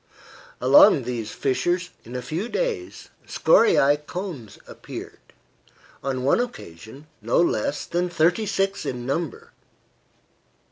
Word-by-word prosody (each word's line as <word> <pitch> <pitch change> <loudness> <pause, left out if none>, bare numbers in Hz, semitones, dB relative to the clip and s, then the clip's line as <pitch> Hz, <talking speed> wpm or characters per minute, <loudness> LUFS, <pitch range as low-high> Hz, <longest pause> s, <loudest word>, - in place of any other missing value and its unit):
Along - - +6
these 115 -4 -4
fissures, 175 +7 -1
in 120 +3 -10
a 125 - -4
few 165 - -4
days, 445 - -3 0.2
scoriae 420 - +4
cones 170 - -7
appeared; - - -10 0.8
on 130 -1 -2
one 140 - +3
occasion 135 - -7 0.2
no 115 +3 +1
less 145 -4 0
than 175 +1 -1
thirty 175 +6 +1
six 195 0 -1
in 120 -1 -4
number. 140 +1 -4
155 Hz, 110 wpm, -23 LUFS, 125-195 Hz, 0.8 s, Along